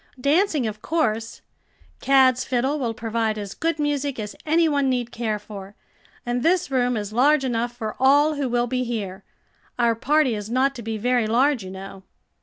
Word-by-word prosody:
"Dancing, 300 - +2
of 215 -1 -5
course. 225 -9 -1 0.6
Cad's 260 -2 +4
fiddle 265 +4 0
will 235 -4 -2
provide 225 -1 -1
as 205 -2 -6
good 330 0 -1
music 290 -2 -1
as 210 -1 -5
any 325 +2 +4
one 285 -3 +1
need 245 -2 -1
care 225 -3 -2
for, 205 -1 -10 0.5
and 245 0 -1
this 350 +1 +1
room 250 -2 +1
is 205 0 -5
large 275 +4 +4
enough 240 -1 -1
for 220 -3 -4
all 285 +4 +4
who 285 -3 -2
will 240 0 +1
be 255 +1 -1
here. 205 -5 -4 0.5
Our 235 -1 +3
party 275 +3 +2
is 210 0 -5
not 260 +3 +2
to 245 - -8
be 225 -1 -4
very 240 +1 +1
large, 250 +1 +2
you 185 - -8
know." 190 0 -9
245 Hz, 185 wpm, -23 LUFS, 220-280 Hz, 0.6 s, Cad's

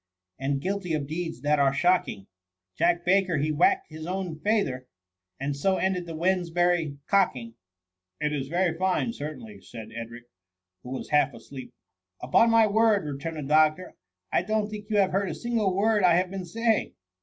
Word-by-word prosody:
And 135 +1 -1
guilty 185 -2 -2
of 145 -2 -2
deeds 165 -2 -5
that 150 +1 +2
are 140 -1 +4
shocking, 175 - +1 0.5
Jack 175 +1 +1
Baker 185 -2 +3
he 150 +2 0
whack'd 155 +3 +2
his 155 0 -8
own 180 -4 -4
feyther. 155 - 0 0.5
And 140 +1 -2
so 190 +7 +1
ended 180 -1 -1
the 165 - -6
Wednesbury 175 -3 +1
cocking.' 130 - +1 0.2
»» 90 0 -63
" 90 0 -59
It 150 0 -1
is 135 -2 -3
very 175 +1 0
fine 190 +6 0
certainly,'' 205 +7 -8
said 110 -2 -10
Edric, 115 +1 -7 0.6
who 125 - -10
was 130 - -6
half 145 -3 +3
asleep. 125 +1 -10 0.3
" 90 0 -60
Upon 230 - +4
ray 225 -1 +6
word,'' 215 -2 +3
returned 150 +3 -5
the 150 - -4
doctor, 155 +4 +2 0.2
" 90 0 -56
I - - +3
don't 215 +2 -1
think 210 0 -8
you 210 - +1
have 195 -2 +3
heard 195 +1 0
a - - -4
single 230 -5 0
word 210 +1 +2
I 175 -2 +5
have 180 +1 +1
been 190 -2 -5
saying." 225 +5 0
170 Hz, 190 wpm, -26 LUFS, 140-195 Hz, 0.6 s, ray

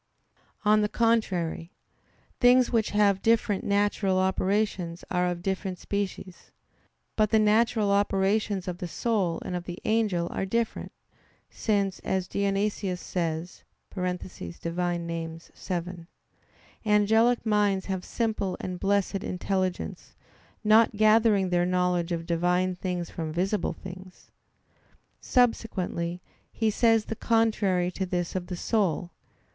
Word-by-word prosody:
On 215 0 +5
the 210 - +1
contrary, 195 -9 0 0.7
Things 250 0 +5
which 225 -3 +1
have 205 -2 +3
different 220 -3 +2
natural 200 -1 +1
operations 190 -2 0
are 180 0 +1
of 175 -1 -3
different 190 -1 -2
species. 190 -2 -5 0.7
But 215 -1 +2
the 220 - +4
natural 215 0 +3
operations 200 0 +1
of 180 -1 -4
the 180 - -4
soul 190 -4 -1
and 180 - -3
of 175 0 -5
an 175 - -4
angel 210 -6 +1
are - - -2
different; 230 +4 -2 0.6
since, 200 -3 0
as 190 -1 -2
Dionysius 200 -2 -1
says 170 -1 -4 0.3
(Div. 185 - -3
Nom. 170 - -3
vii), 175 0 -6 0.8
"Angelic 220 +3 +3
minds 205 -3 +2
have 190 -2 -3
simple 215 -5 -2
and 180 -1 -5
blessed 200 0 0
intelligence, 185 0 -3 0.5
not 220 +1 +5
gathering 215 -2 +4
their 175 0 +2
knowledge 180 -1 +1
of 165 -1 -2
Divine 180 +2 +1
things 180 -1 -4
from 160 -2 -4
visible 190 +5 -1
things." 185 0 -12 0.9
Subsequently 185 -8 0 0.3
he 220 -2 0
says 225 -1 +3
the 225 - -4
contrary 210 -6 +1
to 190 +1 -3
this 175 -1 -2
of 180 -1 -3
the 180 - -5
soul. 180 -5 0
190 Hz, 120 wpm, -27 LUFS, 180-215 Hz, 0.9 s, On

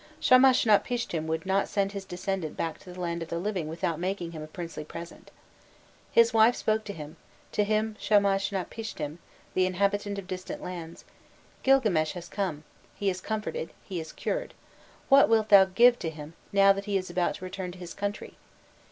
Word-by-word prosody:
Shamashnapishtim 245 -8 +4
would 160 +3 -2
not 195 +1 +1
send 200 -1 0
his 200 -1 -6
descendant 185 -3 -4
back 165 -1 -3
to 180 - -12
the 180 - -10
land 170 -1 -2
of 165 - -6
the 170 - -2
living 180 -3 -2
without 165 0 -2
making 180 -1 -3
him 160 -2 -7
a 155 - -7
princely 165 -1 -7
present. 170 +2 -10 0.8
"His 230 0 +5
wife 225 +2 +5
spoke 215 0 0
to 200 - -5
him, 155 -1 -9 0.3
to 210 - +1
him 215 +1 0
Shamashnapishtim, 195 -4 0 0.3
the 185 0 +3
inhabitant 200 +2 0
of 200 - -6
distant 185 0 -6
lands: 170 -2 -7 0.6
'Gilgames 215 -13 +3
has 175 -1 -8
come, 180 -7 -3 0.3
he 200 -1 0
is 180 0 -6
comforted, 215 -6 -4
he 185 -3 -5
is 160 -1 -7
cured; - - -3 0.5
what 275 -2 +6
wilt 220 -1 +3
thou 195 -1 +9
give 240 +6 +5
to 165 - -2
him, 155 0 -9 0.2
now 195 0 +6
that 195 0 -6
he 205 -2 +1
is 185 -2 -4
about 175 0 0
to 185 - -8
return 185 -1 -5
to - - -12
his 175 -1 -8
country? 205 +1 -5
190 Hz, 180 wpm, -28 LUFS, 170-210 Hz, 0.8 s, thou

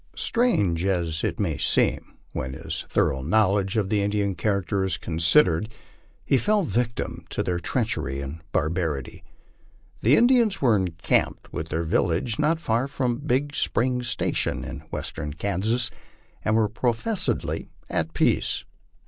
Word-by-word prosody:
Strange 105 - +1
as 85 -4 0
it - - -1
may 85 -7 -1
seem, - - +1 0.2
when 65 0 -4
his 80 +3 -5
thor - - +2
ough 65 - -5
knowledge 100 +3 +2
of 100 -3 +1
the 105 -1 +2
Indian 100 -1 0
character 100 +1 0
is 95 -4 0
considered, 85 - +3 0.6
he 135 - +3
fell 210 - +2
a - - -2
victim 120 -4 -2
to - - -1
their 90 -1 -1
treachery 70 -4 -1
and 70 +3 -6
barbarity. 80 -4 -2 0.8
The 125 +7 +5
Indians 235 -1 +4
were 120 -5 +4
encamped 90 -5 0
with 80 - -4
their 80 +2 -1
village 85 - 0
not 160 +2 +2
far 120 -4 0
from 125 -4 -1
Big 145 0 0
Spring 125 -1 0
station, 120 -1 -1
in - - -6
western 75 -2 -4
Kansas, 105 +6 0 0.5
and 110 - +2
were 110 -1 +3
professedly 120 - -1 0.2
at 80 0 -2
peace. - - +2
100 Hz, 145 wpm, -25 LUFS, 80-125 Hz, 0.8 s, The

